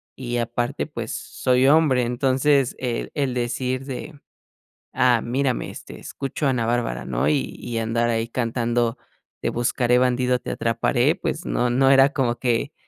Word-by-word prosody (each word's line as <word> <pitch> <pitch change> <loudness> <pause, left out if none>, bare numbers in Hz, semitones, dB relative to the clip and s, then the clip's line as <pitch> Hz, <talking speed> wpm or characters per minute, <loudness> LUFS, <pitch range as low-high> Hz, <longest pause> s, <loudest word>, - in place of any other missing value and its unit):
y 120 -2 -4
aparte, 120 +3 -2
pues 120 -7 -5
soy 130 0 +1
hombre. 145 -4 +4
Entonces, 130 +2 +2
el 125 -2 -3
el 140 -4 -1
decir 125 +1 -2
de: 140 +3 -7 0.7
"Ah, 120 -3 +3
mírame, 130 +1 -1
este, - - -10
escucho 140 +1 -4
a - - +3
Ana 120 -3 0
Bárbara", 115 - -1
¿no? 60 -2 0
Y 145 -2 -1
y 120 - -5
andar 115 +1 0
ahí 115 0 0
cantando: 120 0 -1 0.4
"Te - - 0
buscaré, 120 +1 +1
bandido, 125 0 +2
te - - -6
atraparé", 115 -1 +1
pues, - - -4
no 125 - 0
no 135 +2 +4
era 135 +1 +6
como 125 -4 0
que 120 -3 0
125 Hz, 160 wpm, -23 LUFS, 120-130 Hz, 0.7 s, era